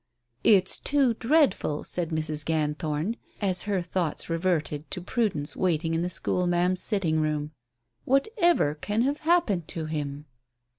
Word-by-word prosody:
"It's 200 -4 +4
too 275 -4 +2
dreadful," 240 - +2
said 175 -3 -3
Mrs. 155 -2 -2
Ganthorn, 155 +5 -1 0.2
as 190 -3 0
her 190 -3 +1
thoughts 170 -2 -2
reverted 165 -3 -1
to - - -3
Prudence 180 -6 -2
waiting 165 -3 0
in 165 - +1
the 175 - -1
school 180 +1 0
ma'am's 175 +1 +1
sitting 175 -7 +1
room. 150 -1 -1 0.5
"Whatever 340 - +2
can 205 +9 -1
have 280 +3 0
happened 310 - +2
to 160 -2 -5
him?" 150 -2 -4
175 Hz, 140 wpm, -27 LUFS, 155-215 Hz, 0.5 s, It's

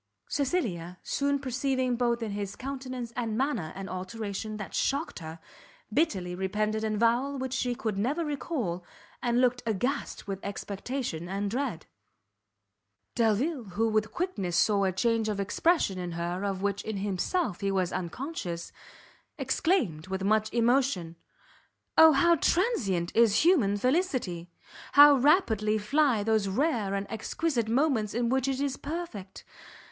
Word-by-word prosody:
Cecilia, 210 - -1
soon 280 0 0
perceiving 260 -1 -1
both 235 -1 0
in 215 - -3
his 200 -1 -4
countenance 255 -3 -6
and 225 -3 -2
manner 240 - -1
an 195 0 -6
alteration 205 +3 -5
that 210 - -7
shocked 280 +4 -1
her, 160 -1 -8 0.6
bitterly 190 - +1
repented 210 +4 -1
an 215 -1 0
avowal 240 +5 +1
she 250 -2 -1
could 215 -4 -3
never 290 +10 0
recall, 250 - -3 0.4
and 240 0 +1
looked 250 -1 +2
aghast 245 +5 -2
with 195 -1 -3
expectation 200 -2 -4
and 200 +1 -2
dread. 240 - -2 1.3
Delvile, 235 +5 +1
who 225 +1 +2
with 215 0 0
quickness 195 - -2
saw 200 0 +3
a 190 - +2
change 225 +3 +1
of 205 -2 -2
expression 200 - +1
in 175 -1 -4
her 175 +3 -3
of 195 -1 -2
which 200 0 0
in 220 -2 -4
himself 200 - -1
he 200 - 0
was 190 -2 0
unconscious, 180 - -4 0.7
exclaimed, 195 - 0
with 190 0 -3
much 215 +2 +2
emotion, 235 -8 +1 0.8
"O 320 0 +9
how 340 +5 +4
transient 220 - +1
is 225 0 +5
human 245 - +4
felicity! 250 - 0 0.4
How 290 +1 +9
rapidly 240 - +3
fly 250 0 +2
those 220 -2 +2
rare 215 -3 0
and 200 0 -2
exquisite 235 +2 -2
moments 235 -5 +1
in 240 0 +1
which 265 +1 +1
it 270 -1 -1
is 280 -1 -1
perfect! 280 - -6
225 Hz, 140 wpm, -28 LUFS, 195-270 Hz, 1.3 s, O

